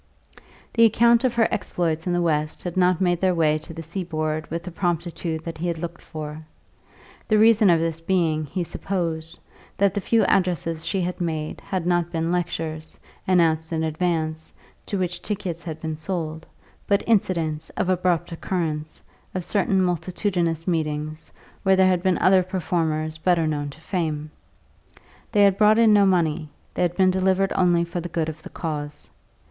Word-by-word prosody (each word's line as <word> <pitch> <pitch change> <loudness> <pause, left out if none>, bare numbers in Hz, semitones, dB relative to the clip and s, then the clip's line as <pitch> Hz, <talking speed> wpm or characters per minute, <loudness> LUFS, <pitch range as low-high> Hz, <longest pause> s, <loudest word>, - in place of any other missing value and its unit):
The 230 - +4
account 235 +2 +5
of 250 -2 +1
her 225 -1 +4
exploits 170 -4 -1
in 175 - +1
the 175 0 +1
West 155 -2 -1
had 175 -2 -4
not 180 -1 +3
made 175 -2 +2
their 185 -1 +2
way 155 -2 +2
to 155 +2 -11
the 165 0 -7
seaboard 155 -3 -3
with 170 +1 -4
the 180 - -7
promptitude 170 -2 -2
that 165 -1 -6
he 175 - -2
had 170 -1 -1
looked 170 +1 -6
for; 155 0 -7 0.8
the 215 - +3
reason 220 -1 +6
of 170 -2 +5
this 165 -1 -1
being, 165 -3 0
he 180 +5 -2
supposed, 165 -3 -3 0.4
that 200 -1 +3
the 205 - -2
few 225 +2 +3
addresses 170 -4 0
she 195 - 0
had 180 +1 -3
made 155 -3 -3
had 185 -3 -3
not 175 -1 +1
been 165 0 -1
lectures, 165 -3 -3 0.3
announced 165 -3 +2
in 160 -1 -1
advance, 160 -1 -1 0.4
to 200 - -2
which 180 -1 -2
tickets 190 -5 -4
had 160 -2 -6
been 160 -1 -4
sold, 160 -1 -4 0.4
but 200 -1 +2
incidents, 165 -8 0
of - - 0
abrupt 180 -2 +1
occurrence, 160 -3 -3 0.3
of 180 -2 -2
certain 195 -2 +2
multitudinous 175 -1 -1
meetings, 155 -2 -2 0.3
where 190 0 +4
there 190 0 +5
had 180 -2 +2
been 185 -1 +2
other 185 0 +5
performers 160 -4 -2
better 170 -1 +2
known 145 -2 -2
to 140 - -13
fame. 155 -4 -3 1.0
They 205 -3 +4
had 195 -1 +4
brought 215 0 +6
in 225 -2 +6
no 200 -1 +5
money; 160 -5 +1 0.2
they - - -3
had 175 -1 +1
been 185 -1 +5
delivered 190 +1 +1
only 175 -2 +3
for 170 +1 -4
the 175 - -6
good 160 -1 -1
of 155 0 -8
the - - -10
cause. 150 -3 -5
170 Hz, 175 wpm, -24 LUFS, 160-185 Hz, 1.0 s, reason